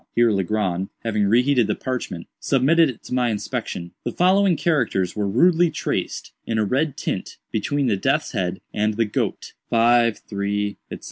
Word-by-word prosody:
Here 120 -1 +4
Legrand, 95 -2 -1
having 105 -3 +1
re 115 +5 +4
heated 125 -5 +3
the 105 - 0
parchment, 125 -10 -4
submitted 145 +4 +3
it 125 - -8
to - - -7
my 125 -1 +2
inspection. 90 -4 -4
The - - -2
following 185 0 +3
characters 120 - 0
were 105 -2 -1
rudely 170 - +4
traced, - - -3
in 115 - -2
a 110 - +2
red 135 +6 0
tint, - - -4
between 145 -1 0
the 110 -5 +1
death's 135 +9 0
head 95 -5 -2
and 105 0 0
the 115 +1 +2
goat: 105 - -3 0.2
"53‡‡†305))6*;4826)4‡.) 105 -3 +1
115 Hz, 160 wpm, -22 LUFS, 105-135 Hz, 0.2 s, Here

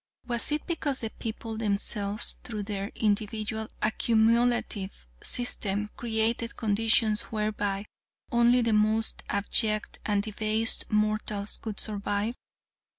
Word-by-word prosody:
Was 240 +2 +2
it 300 0 -1
because 295 -5 -2
the 225 -1 -4
people 225 0 -6
themselves, 205 0 0
through 215 -4 -5
their 200 -1 -3
individual 215 +1 -1 0.2
accumulative 225 - +1 0.2
system, 210 -4 0
created 230 0 0
conditions 220 0 +3
whereby 210 -2 -2 0.5
only 240 +1 +5
the 230 -1 +2
most 215 +1 +1
abject 215 +1 +1
and 205 -1 +1
debased 220 +1 +2
mortals 210 -1 0
could 215 -3 -6
survive? 205 +1 -1
215 Hz, 105 wpm, -28 LUFS, 205-230 Hz, 0.5 s, only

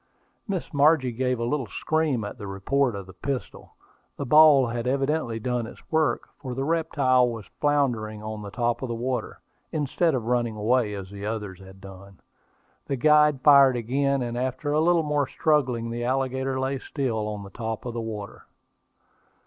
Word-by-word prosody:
Miss 190 -6 -4
Margie 145 -3 +4
gave 125 +1 -1
a - - -1
little 135 -1 -1
scream 155 -3 -1
at 105 - -7
the 100 - -6
report 115 +6 0
of 100 -1 -6
the 95 - -13
pistol. 135 +7 -6 0.4
The 140 - -3
ball 150 -1 +7
had 120 0 -3
evidently 135 -3 0
done 120 0 -2
its - - -12
work, 160 -1 +1
for 130 -3 -6
the 135 - -2
reptile 140 -5 +2
was 115 -3 -6
floundering 120 -8 0
on 110 0 -5
the 100 - -7
top 120 +2 -1
of 130 - -3
the 120 - -3
water, 125 +2 -3 0.3
instead 155 +1 0
of 120 -4 -3
running 120 -2 0
away, 110 0 +1
as 95 -1 -8
the 100 0 -6
other 110 -2 -3
one 95 +1 -15
had 95 0 -15
done. 95 -1 -13 0.7
The 140 - -1
guide 150 +1 +4
fired 140 -3 +7
again; 135 +3 0
and 120 0 -3
after 130 +3 -2
a 155 - +3
little 170 0 +3
more 145 -2 0
struggling, 125 -7 0
the 120 +1 -3
alligator 130 +1 -1
lay 135 +1 -1
still 120 -7 -2
on 105 -1 -5
the 100 - -11
top 115 -1 -5
of 120 - -4
the 115 - -3
water. 105 -3 -7
125 Hz, 185 wpm, -25 LUFS, 110-140 Hz, 0.7 s, ball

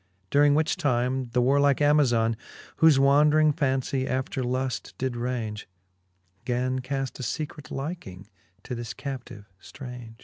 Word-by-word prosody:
During 145 0 +5
which 155 +4 +1
time, 130 -4 0
the 120 +1 0
warlike 140 +1 +3
Amazon, 130 -7 +3 0.4
Whofe 160 -3 +6
wandring 150 +2 +5
fancie 130 -1 0
after 130 0 -2
luft 130 +1 -3
did 130 -1 -2
raunge, 120 -3 -3 0.8
Gan 130 +1 -1
caft 135 +1 -4
a - - -5
fecret 150 +5 -5
hking 135 - -6 0.4
to - - -6
this 120 -1 -5
captive 125 -6 -7
ftraunge. 125 -3 -10
130 Hz, 130 wpm, -26 LUFS, 120-140 Hz, 0.8 s, Whofe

